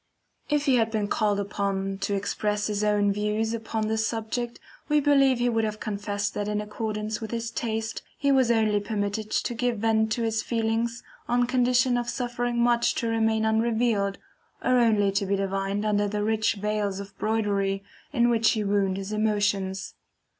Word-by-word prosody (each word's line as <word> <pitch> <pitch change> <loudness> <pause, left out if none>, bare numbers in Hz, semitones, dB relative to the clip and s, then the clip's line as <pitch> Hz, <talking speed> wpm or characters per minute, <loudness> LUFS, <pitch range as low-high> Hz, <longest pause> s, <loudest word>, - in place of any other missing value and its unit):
If 295 -1 +1
he 265 -4 +4
had 225 -1 +2
been 215 -2 -1
called 205 -1 +1
upon 195 -1 -2
to 200 +1 -1
express 210 +1 -1
his 210 -1 -1
own 205 -1 +2
views 210 +2 -1
upon 220 -1 -2
this 220 0 0
subject, 235 +1 -3 0.3
we 300 0 +4
believe 275 -3 +4
he 240 0 +1
would 225 -2 +1
have 215 0 -2
confessed 205 -1 -3
that 205 - -3
in 210 0 -1
accordance 210 0 -3
with 220 - -5
his 230 0 -3
taste, 220 -1 -3 0.2
he 280 -1 +2
was 260 -3 +4
only 220 -3 +3
permitted 205 0 -3
to 240 - -1
give 240 0 -1
vent 220 0 +1
to 235 - -2
his 220 -1 0
feelings 230 0 -1 0.3
on 245 0 +3
condition 250 0 +2
of 240 0 -3
suffering 245 -1 -2
much 240 0 +2
to 230 - -1
remain 225 -1 +1
unrevealed, 220 -2 +1 0.5
or 255 -1 +3
only 215 -4 +3
to 200 +1 0
be 200 - +2
divined 195 +1 -1
under 205 -1 +2
the 205 0 -2
rich 220 0 +1
veils 205 -1 -1
of 200 0 -9
broidery 200 -3 0 0.3
in 240 -4 +3
which 230 -2 +3
he 215 - -1
wound 200 -2 +1
his 195 +1 -5
emotions. 205 -3 0
220 Hz, 180 wpm, -26 LUFS, 205-235 Hz, 0.5 s, he